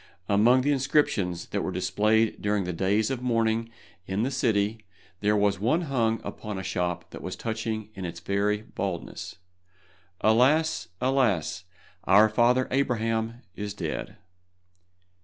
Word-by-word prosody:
Among 115 +6 +5
the 145 +3 +1
inscriptions 130 - +1
that - - -1
were - - -2
displayed 110 +1 +1
during 105 -1 +1
the 90 0 -3
days 100 +7 +1
of 130 -2 -3
mourning 115 -2 +1 0.4
in 95 +3 -1
the 130 - -1
city 110 -4 0 0.4
there 105 0 +2
was 100 -2 +2
one 125 - +2
hung 115 -8 0
upon 105 -2 -6
a 95 - -4
shop 90 -2 -2
that - - -8
was 90 - -5
touching 110 -1 -4
in 95 - -7
its 85 -1 -5
very 100 +3 0
baldness: 95 -5 -5 0.9
"Alas! 135 - +3
alas! 105 - +1 0.4
our 105 +4 +6
father 120 +3 +3
Abraham 115 -3 0
is 105 +1 -5
dead." 80 -6 -4
110 Hz, 140 wpm, -27 LUFS, 100-120 Hz, 0.9 s, our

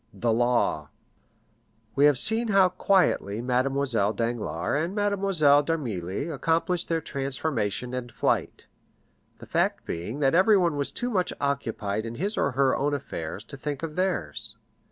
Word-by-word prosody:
The 115 -1 +1
Law 120 - +1 1.0
We 140 - +4
have 145 -3 +5
seen 225 - +2
how 195 -3 +5
quietly 180 - +1
Mademoiselle 125 -3 +1
Danglars 115 - -1
and 180 +4 -4
Mademoiselle 195 -8 +3
d'Armilly 125 - -3
accomplished 165 +3 0
their 165 -1 0
transformation 135 -5 -3
and 125 -1 -4
flight; - - -1 0.7
the - - -12
fact - - 0
being 90 - -5
that 135 -2 +2
everyone 185 -3 +4
was 140 -1 -2
too 245 0 -3
much 185 -4 0
occupied 115 -6 -2
in 115 - -6
his 200 - -2
or 140 - 0
her 135 +1 +3
own 145 +1 0
affairs 105 - -6
to 115 - -10
think 145 +1 -4
of 155 -2 -4
theirs. 180 - -1
140 Hz, 145 wpm, -26 LUFS, 115-170 Hz, 1.0 s, have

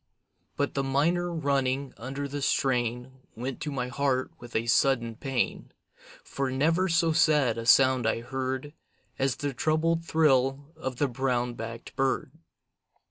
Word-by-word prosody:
But 145 - 0
the 135 - 0
minor 165 +6 +1
running 140 -3 0
under 135 +4 -5
the 145 +1 -5
strain 125 -1 0 0.2
Went 125 +3 -5
to 150 - -3
my 125 -3 -2
heart 130 0 0
with 120 0 -12
a 110 - +1
sudden 120 -1 +2
pain, 130 0 -2 0.5
For 135 -1 -3
never 165 +8 +1
so 165 0 +3
sad 150 -8 +3
a 115 - -5
sound 130 -2 +5
I 115 - 0
heard 130 +3 -4 0.5
As 135 -1 +1
the 145 -1 -3
troubled 160 +4 +1
thrill 140 -2 +2
of 130 -1 -5
the 145 +3 +1
brown 125 -1 -1
backed 115 0 -8
bird. 135 -1 0
135 Hz, 145 wpm, -28 LUFS, 125-145 Hz, 0.5 s, sound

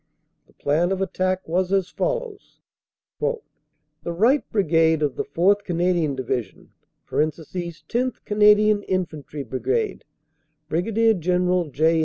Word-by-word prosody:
The - - -26
plan 165 +6 0
of 190 - -1
attack 185 -1 -1
was 180 +3 0
as 195 -2 +1
follows: - - -4 0.6
"The 480 - -1 0.7
right 230 +12 +3
Brigade 160 -6 +2
of 145 -3 0
the - - -2
4th. 200 +4 +2
Canadian 175 -5 0
Division 125 -5 -4 0.4
(10th. 170 - -3
Canadian 210 0 +4
Infantry 155 -7 -4
Brigade, 130 -2 -2 0.7
Brig. 220 +4 +1
General 180 -1 +1
J. 160 +4 +2
180 Hz, 110 wpm, -23 LUFS, 160-205 Hz, 0.7 s, Canadian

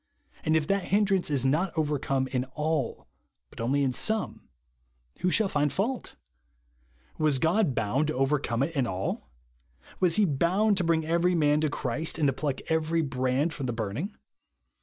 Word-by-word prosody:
And 155 - +2
if 155 - 0
that 195 +2 0
hindrance 195 -3 +2
is 135 -3 +1
not 160 +7 +1
overcome 145 -3 0
in 125 -1 -1
all, 150 -4 -2 0.4
but - - -8
only 140 +5 +1
in 130 -2 +1
some, 220 - -1 0.7
who 180 - +1
shall 210 +3 +3
find 145 -5 0
fault? 225 - -2 1.0
Was 155 -3 +3
God 165 - +2
bound 120 +8 0
to 155 - -2
overcome 135 -2 +1
it 165 +3 -3
in 130 -4 +1
all?. 95 -8 -3 0.7
Was 180 -3 +4
he 210 - +4
bound 185 +7 +2
to 185 - +1
bring 165 -1 +1
every 170 +2 +2
man 150 -2 +3
to 155 - +1
Christ, 145 +3 -1
and 155 - +1
to 135 - +3
pluck 140 0 -3
every 160 0 +1
brand 135 +3 0
from 135 -3 -4
the 120 - -2
burning 115 - -4
150 Hz, 170 wpm, -27 LUFS, 135-170 Hz, 1.0 s, Was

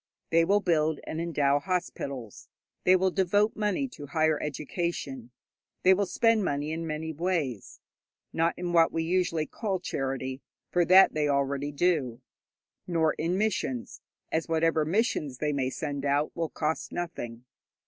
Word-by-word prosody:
They 165 0 +5
will 205 +3 +3
build 160 -4 +1
and 160 - -4
endow 145 -4 +2
hospitals, 140 - -4 0.4
they 185 - +7
will 185 0 +2
devote 205 +4 +2
money 210 +6 0
to 145 - -10
higher 155 +1 +1
education, 150 -4 -4 0.5
they 185 - +7
will 195 +1 +1
spend 225 +3 +3
money 145 -2 -1
in 165 +1 -3
many 160 +1 -3
ways, 155 - -2 0.5
not 165 +1 +1
in 175 -1 -3
what 165 -1 +5
we 165 - -1
usually 170 -2 0
call 200 -1 -3
charity, 135 -4 -3 0.3
for 175 -1 +3
that 185 +3 +7
they 150 -1 +1
already 140 +1 0
do, 145 -6 0 0.7
nor 160 -3 +2
in 170 +3 -1
missions, 190 - -2 0.3
as 160 +1 -1
whatever 160 -1 +2
missions 155 - 0
they 150 +1 -1
may 130 -2 0
send 145 0 -4
out 145 +1 0
will 165 -2 -2
cost 155 0 -2
nothing. 125 -9 -5
160 Hz, 150 wpm, -28 LUFS, 145-180 Hz, 0.7 s, they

